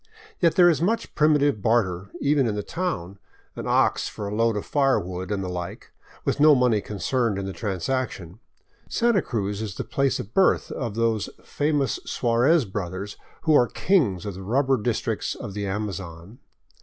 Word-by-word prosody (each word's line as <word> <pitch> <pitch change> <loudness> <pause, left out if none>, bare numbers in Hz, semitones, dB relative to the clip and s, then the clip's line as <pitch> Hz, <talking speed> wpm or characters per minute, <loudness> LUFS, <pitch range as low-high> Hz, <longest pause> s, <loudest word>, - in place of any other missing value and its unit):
Yet 170 -2 +3
there 175 -1 +7
is 165 -3 +3
much 220 +7 0
primitive 145 -7 +3
barter, 100 -5 +1
even 140 -3 +2
in 105 - -1
the 105 - -3
town, 100 - -4 0.2
— - - -36
an - - -5
ox - - +2
for 105 - -6
a 100 - -4
load 115 0 +1
of 105 - -4
firewood, 95 - 0
and 100 -1 -1
the - - -4
like, 90 -1 -6 0.3
with - - 0
no 150 0 +7
money 125 -5 +3
concerned 105 +2 -1
in 100 - -3
the 95 - -4
transaction. 95 0 -3 0.5
Santa 235 -5 +2
Cruz 105 -6 -3
is 105 -4 -5
the - - -3
place 135 -2 0
of 105 - -7
birth 190 -1 +3
of 115 -5 -4
those 115 -3 0
famous 145 -4 0
Suarez 125 +5 +2
brothers 95 0 -5 0.3
who 160 - +3
are 125 -5 +5
kings 120 - +1
of 100 - -4
the 95 - -9
rubber 130 +7 +1
districts 115 +1 -1
of 100 - -7
the 100 0 -3
Amazon. 95 -1 -5
110 Hz, 180 wpm, -24 LUFS, 95-140 Hz, 0.5 s, there